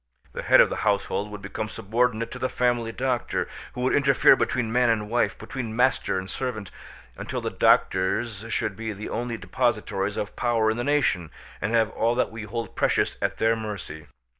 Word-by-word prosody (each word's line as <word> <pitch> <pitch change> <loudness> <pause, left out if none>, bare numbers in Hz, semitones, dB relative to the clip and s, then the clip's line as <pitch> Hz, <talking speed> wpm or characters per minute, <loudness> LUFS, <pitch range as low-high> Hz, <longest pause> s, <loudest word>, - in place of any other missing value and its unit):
The - - -4
head - - +5
of - - +4
the - - -3
household 100 0 0
would 105 -1 -9
become 105 +3 -4
subordinate 115 +2 0
to 130 - -7
the 130 - -1
family 120 -2 0
doctor, 125 0 -1 0.3
who 125 - -5
would 130 - +1
interfere 140 -2 +5
between 115 -3 -1
man 125 0 +3
and 110 -1 0
wife, 120 - +1
between 120 -4 -5
master 125 -5 +2
and 95 0 -4
servant, 110 -4 -4 0.5
until - - -4
the - - -3
doctors 100 +3 +2
should 100 - -1
be 110 0 -4
the 105 +2 -7
only 120 -1 -3
depositaries 105 -1 -1
of 100 - -4
power 115 -3 +2
in 110 - -3
the 120 - -1
nation, 125 - +1 0.3
and 100 - -1
have 115 -2 +2
all 115 +1 +1
that 125 - 0
we 110 -1 -7
hold 115 0 -5
precious - - +1
at - - -1
their 115 +1 +3
mercy. 105 -8 -6
115 Hz, 190 wpm, -25 LUFS, 105-120 Hz, 0.5 s, head